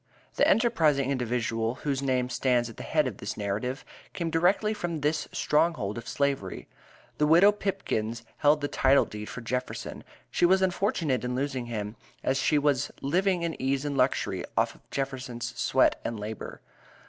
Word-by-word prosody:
The -, -, +3 dB
enterprising 155 Hz, -, +3 dB
individual, 120 Hz, -2 st, -1 dB
whose 140 Hz, -2 st, 0 dB
name 130 Hz, -2 st, +1 dB
stands 125 Hz, -1 st, +1 dB
at -, -, -16 dB
the -, -, -7 dB
head 155 Hz, -2 st, +1 dB
of 120 Hz, -7 st, -4 dB
this 100 Hz, -, -5 dB
narrative, 105 Hz, +6 st, -3 dB, 0.3 s
came 170 Hz, -2 st, -2 dB
directly 185 Hz, +6 st, +2 dB
from 170 Hz, -6 st, -3 dB
this 150 Hz, +2 st, 0 dB
stronghold 150 Hz, -10 st, +1 dB
of 115 Hz, -, -7 dB
Slavery. 140 Hz, -9 st, -1 dB, 0.5 s
The 150 Hz, -, +4 dB
widow 175 Hz, +6 st, +7 dB
Pipkins 115 Hz, -, -2 dB
held 150 Hz, +1 st, +4 dB
the 145 Hz, -, 0 dB
title 135 Hz, 0 st, +4 dB
deed 105 Hz, 0 st, -7 dB
for 125 Hz, -, -7 dB
Jefferson. 125 Hz, +2 st, -4 dB, 0.3 s
She -, -, -1 dB
was 190 Hz, +1 st, +4 dB
unfortunate 175 Hz, -, 0 dB
in 125 Hz, 0 st, -2 dB
losing 130 Hz, -2 st, -2 dB
him, 105 Hz, -2 st, -4 dB, 0.3 s
as 135 Hz, +1 st, +1 dB
she 150 Hz, -, +3 dB
was 145 Hz, -1 st, +2 dB
living 180 Hz, +5 st, +1 dB
in 165 Hz, -1 st, -1 dB
ease 135 Hz, +1 st, 0 dB
and 145 Hz, -1 st, -2 dB
luxury 130 Hz, 0 st, +1 dB
off -, -, +2 dB
of -, -, -23 dB
Jefferson's 130 Hz, -3 st, -4 dB
sweat -, -, +2 dB
and 115 Hz, -2 st, -3 dB
labor. 105 Hz, +1 st, -6 dB
135 Hz, 170 wpm, -28 LUFS, 120-155 Hz, 0.5 s, widow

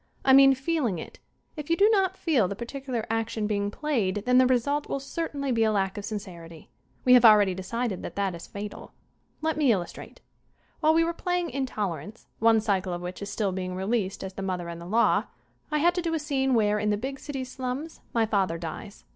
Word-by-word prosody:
I 265 Hz, -, +6 dB
mean 270 Hz, 0 st, +8 dB
feeling 270 Hz, -, -1 dB
it. -, -, -9 dB, 0.4 s
If 300 Hz, -1 st, -7 dB
you 335 Hz, -, +2 dB
do 405 Hz, -, +6 dB
not 380 Hz, -3 st, +2 dB
feel 270 Hz, -, +2 dB
the 200 Hz, -, -4 dB
particu 265 Hz, +5 st, -7 dB
lar 235 Hz, -4 st, -2 dB
action 225 Hz, -1 st, -1 dB
being 205 Hz, -1 st, 0 dB
played 210 Hz, -7 st, -1 dB
then 250 Hz, 0 st, +5 dB
the 255 Hz, -, +5 dB
result 280 Hz, +4 st, 0 dB
will 275 Hz, -, -1 dB
cer 325 Hz, +4 st, -4 dB
tainly 280 Hz, -3 st, -2 dB
be 225 Hz, -1 st, +2 dB
a 220 Hz, -, +3 dB
lack 195 Hz, -1 st, 0 dB
of 205 Hz, -1 st, -5 dB
sincerity. 170 Hz, -6 st, -8 dB, 0.3 s
We 250 Hz, -, +7 dB
have 250 Hz, -1 st, +7 dB
already 210 Hz, -4 st, +7 dB
decided 195 Hz, +2 st, -3 dB
that -, -, -7 dB
that 195 Hz, -2 st, -1 dB
is 170 Hz, -, -9 dB
fatal. 205 Hz, 0 st, -8 dB, 0.5 s
Let 315 Hz, -1 st, 0 dB
me 290 Hz, -5 st, +4 dB
illustrate: 180 Hz, -5 st, -4 dB, 0.6 s
While 315 Hz, 0 st, +4 dB
we 330 Hz, -, +4 dB
were 335 Hz, +1 st, -1 dB
playing 355 Hz, -1 st, -2 dB
"Intolerance," 210 Hz, -, -4 dB
one 225 Hz, 0 st, +4 dB
cycle 195 Hz, -4 st, 0 dB
of 175 Hz, -, -4 dB
which 180 Hz, +2 st, -6 dB
is 200 Hz, -, -5 dB
still 205 Hz, -3 st, -1 dB
being 185 Hz, 0 st, -4 dB
released 195 Hz, 0 st, -1 dB
as 190 Hz, 0 st, -6 dB
"The 195 Hz, -, -6 dB
Mother 180 Hz, -3 st, -3 dB
and 170 Hz, 0 st, -7 dB
the 170 Hz, -, -9 dB
Law," 225 Hz, +5 st, +3 dB, 0.4 s
I 300 Hz, -, 0 dB
had 345 Hz, +4 st, +3 dB
to 355 Hz, -, -1 dB
do 330 Hz, -1 st, -1 dB
a -, -, +1 dB
scene 270 Hz, -3 st, 0 dB
where, 210 Hz, -2 st, +2 dB
in 210 Hz, -, 0 dB
the 205 Hz, -, +1 dB
big 265 Hz, +5 st, -5 dB
city's 265 Hz, -3 st, -6 dB
slums, 260 Hz, +5 st, -5 dB
my 230 Hz, -1 st, +2 dB
father 195 Hz, -6 st, 0 dB
dies. 170 Hz, +4 st, -8 dB
225 Hz, 220 wpm, -27 LUFS, 195-275 Hz, 0.6 s, mean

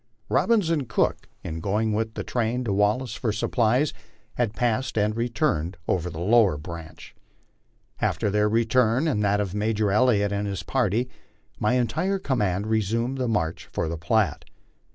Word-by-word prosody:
Robbins 210 Hz, -8 st, +2 dB
and 145 Hz, -7 st, -1 dB
Cook, -, -, 0 dB
in 80 Hz, 0 st, -5 dB
going 105 Hz, +5 st, 0 dB
with 110 Hz, +1 st, -2 dB
the -, -, -3 dB
train 120 Hz, +1 st, -1 dB
to 105 Hz, -5 st, -1 dB
Wallace 105 Hz, +5 st, +1 dB
for 115 Hz, -1 st, -1 dB
supplies, 120 Hz, +6 st, +1 dB, 0.4 s
had 115 Hz, -3 st, -1 dB
passed 120 Hz, +1 st, 0 dB
and 105 Hz, +1 st, +1 dB
returned 115 Hz, -, -1 dB
over 90 Hz, -1 st, 0 dB
the 80 Hz, -, -8 dB
lower 105 Hz, -2 st, +4 dB
branch. 80 Hz, +1 st, -9 dB, 0.9 s
After 105 Hz, -, 0 dB
their 105 Hz, +1 st, +2 dB
return 115 Hz, +4 st, +2 dB
and 125 Hz, -9 st, +1 dB
that 100 Hz, 0 st, +2 dB
of 100 Hz, -3 st, -2 dB
Major 105 Hz, 0 st, 0 dB
Elliott 105 Hz, -2 st, +3 dB
and 100 Hz, 0 st, -1 dB
his 95 Hz, -4 st, -4 dB
party, 120 Hz, +1 st, 0 dB, 0.5 s
my 105 Hz, +3 st, +2 dB
entire 160 Hz, +11 st, 0 dB
command 105 Hz, -, -1 dB
resumed 115 Hz, +4 st, 0 dB
the 125 Hz, -, 0 dB
march 85 Hz, -8 st, -2 dB
for -, -, -1 dB
the 85 Hz, -, -3 dB
Platte. 100 Hz, -, 0 dB
110 Hz, 160 wpm, -25 LUFS, 100-125 Hz, 0.9 s, lower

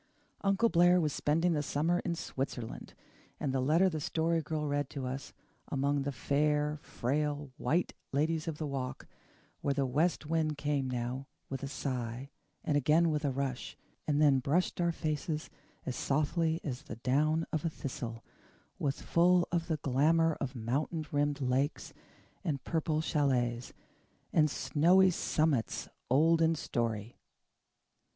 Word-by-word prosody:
Uncle 200 Hz, +3 st, +3 dB
Blair 175 Hz, -2 st, +5 dB
was 155 Hz, -4 st, 0 dB
spending 165 Hz, +4 st, +2 dB
the 150 Hz, -, +1 dB
summer 160 Hz, +5 st, +1 dB
in 170 Hz, -1 st, -2 dB
Switzerland; 130 Hz, -7 st, -5 dB, 0.4 s
and 135 Hz, -, -1 dB
the 135 Hz, -, +1 dB
letter 155 Hz, +8 st, +4 dB
the 160 Hz, -4 st, -2 dB
Story 165 Hz, +2 st, +1 dB
Girl 155 Hz, 0 st, -3 dB
read 145 Hz, -1 st, -1 dB
to 135 Hz, -3 st, -5 dB
us, 130 Hz, +1 st, -5 dB, 0.4 s
among 140 Hz, +1 st, 0 dB
the 140 Hz, +1 st, -2 dB
fair, 150 Hz, +3 st, +1 dB
frail 145 Hz, +2 st, -2 dB
White 170 Hz, +3 st, 0 dB, 0.2 s
Ladies 155 Hz, +3 st, 0 dB
of 160 Hz, -2 st, -3 dB
the 155 Hz, -, -3 dB
Walk, 135 Hz, -3 st, -4 dB, 0.5 s
where 140 Hz, -1 st, 0 dB
the 140 Hz, -1 st, +1 dB
west 155 Hz, +6 st, +1 dB
wind 155 Hz, -1 st, 0 dB
came 140 Hz, -2 st, 0 dB
now 125 Hz, +2 st, -3 dB, 0.2 s
with 135 Hz, -, -4 dB
a 140 Hz, -, -3 dB
sigh, 130 Hz, -1 st, -4 dB, 0.3 s
and 150 Hz, -, 0 dB
again 155 Hz, +4 st, +4 dB
with 150 Hz, 0 st, -1 dB
a 145 Hz, -, +2 dB
rush, 135 Hz, -1 st, -3 dB, 0.3 s
and 145 Hz, -1 st, +2 dB
then 145 Hz, -3 st, +5 dB
brushed 165 Hz, +7 st, 0 dB
our 170 Hz, 0 st, +2 dB
faces 155 Hz, -1 st, -3 dB, 0.3 s
as 130 Hz, -, -3 dB
softly 160 Hz, +3 st, +1 dB
as 130 Hz, -2 st, -4 dB
the 150 Hz, -8 st, -8 dB
down 150 Hz, +7 st, +1 dB
of 155 Hz, -, 0 dB
a 165 Hz, -, +1 dB
thistle, 120 Hz, -6 st, -6 dB, 0.6 s
was 140 Hz, -1 st, -2 dB
full 175 Hz, +1 st, +4 dB
of 170 Hz, -1 st, 0 dB
the 160 Hz, -3 st, 0 dB
glamour 155 Hz, +4 st, +3 dB
of 135 Hz, -1 st, -3 dB
mountain 140 Hz, +7 st, -2 dB
rimmed 145 Hz, 0 st, 0 dB
lakes, 135 Hz, +4 st, 0 dB, 0.5 s
and 145 Hz, -8 st, -2 dB
purple 160 Hz, -2 st, 0 dB
chalets, 125 Hz, -6 st, 0 dB, 0.6 s
and 155 Hz, -2 st, +4 dB
"snowy 180 Hz, +7 st, +4 dB
summits 155 Hz, -8 st, 0 dB, 0.2 s
old 160 Hz, +6 st, +4 dB
in 165 Hz, 0 st, +4 dB
story." 115 Hz, -6 st, -3 dB
150 Hz, 150 wpm, -32 LUFS, 135-160 Hz, 0.6 s, Blair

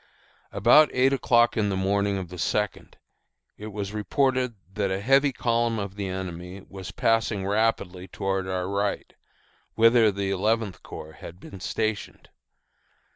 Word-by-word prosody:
About 155 Hz, -1 st, +6 dB
eight 130 Hz, +2 st, +3 dB
o'clock 120 Hz, -3 st, +3 dB
on 105 Hz, -2 st, +1 dB
the 95 Hz, -, -1 dB
morning 100 Hz, +1 st, +1 dB
of 95 Hz, -3 st, -5 dB
the 90 Hz, -1 st, -9 dB
second, 105 Hz, +4 st, -2 dB, 0.6 s
it 105 Hz, -, -9 dB
was 100 Hz, -1 st, -5 dB
reported 125 Hz, +3 st, 0 dB, 0.2 s
that 100 Hz, -1 st, -1 dB
a 95 Hz, 0 st, -1 dB
heavy 135 Hz, +6 st, +3 dB
column 115 Hz, -2 st, 0 dB
of 100 Hz, -2 st, -5 dB
the 100 Hz, -1 st, -4 dB
enemy 95 Hz, 0 st, -6 dB
was 95 Hz, -2 st, -8 dB
passing 115 Hz, -3 st, 0 dB
rapidly 100 Hz, -3 st, 0 dB
toward 95 Hz, +1 st, -2 dB
our 90 Hz, -1 st, -2 dB
right, 100 Hz, +1 st, -2 dB, 0.6 s
whither 115 Hz, -1 st, +5 dB
the 100 Hz, 0 st, -2 dB
Eleventh 105 Hz, 0 st, 0 dB
Corps 80 Hz, -, -9 dB
had 85 Hz, +2 st, -10 dB
been 95 Hz, -1 st, -11 dB
stationed. 110 Hz, +3 st, -3 dB
100 Hz, 145 wpm, -25 LUFS, 95-115 Hz, 0.6 s, About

